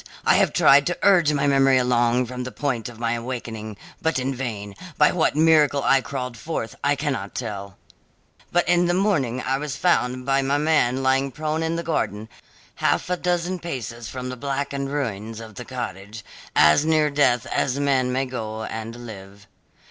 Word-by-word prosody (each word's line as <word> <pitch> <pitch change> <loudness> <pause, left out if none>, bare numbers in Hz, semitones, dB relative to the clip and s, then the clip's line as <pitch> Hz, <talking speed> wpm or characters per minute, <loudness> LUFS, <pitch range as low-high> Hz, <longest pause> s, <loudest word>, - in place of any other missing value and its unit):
I - - +5
have - - +3
tried 140 +1 +5
to 175 - -1
urge 175 -7 +5
my 145 -1 0
memory 135 -1 +4
along 125 0 +2
from 125 +1 -6
the 125 - -6
point 125 -6 -2
of 120 - -12
my 115 0 -1
awakening, 115 -3 -5 0.2
but 160 -3 0
in 130 +1 -1
vain. 110 -6 -5 0.2
By 150 - +5
what 160 -4 +1
miracle 155 -3 +4
I 135 0 +4
crawled 125 0 -5
forth, 115 -3 -4
I 145 0 +3
cannot 145 -1 -3
tell; 100 -5 -5 0.7
but 175 0 +2
in 175 0 +3
the 175 - +1
morning 145 - +1
I 135 +1 0
was 150 -2 -4
found 130 -8 +1
by 135 +1 +2
my 135 +1 +1
man 145 -4 +2
lying 135 +1 +2
prone 155 +4 -3
in 165 0 -1
the 170 - -3
garden, 110 - -2 0.5
half - - 0
a - - +3
dozen 180 +1 -1
paces 120 -8 -6
from 125 -1 -5
the 125 - -6
blackened 140 +1 -3
ruins 115 -6 -3
of 110 -1 -10
the 125 +4 -8
cottage, 105 -4 -7 0.3
as 75 - +6
near 155 -1 +2
death 125 -5 +2
as 135 +1 -1
man 135 -3 +1
may 130 +2 0
go 110 -4 -5
and 115 +2 -6
live. 100 -2 -11
130 Hz, 185 wpm, -23 LUFS, 115-145 Hz, 0.7 s, as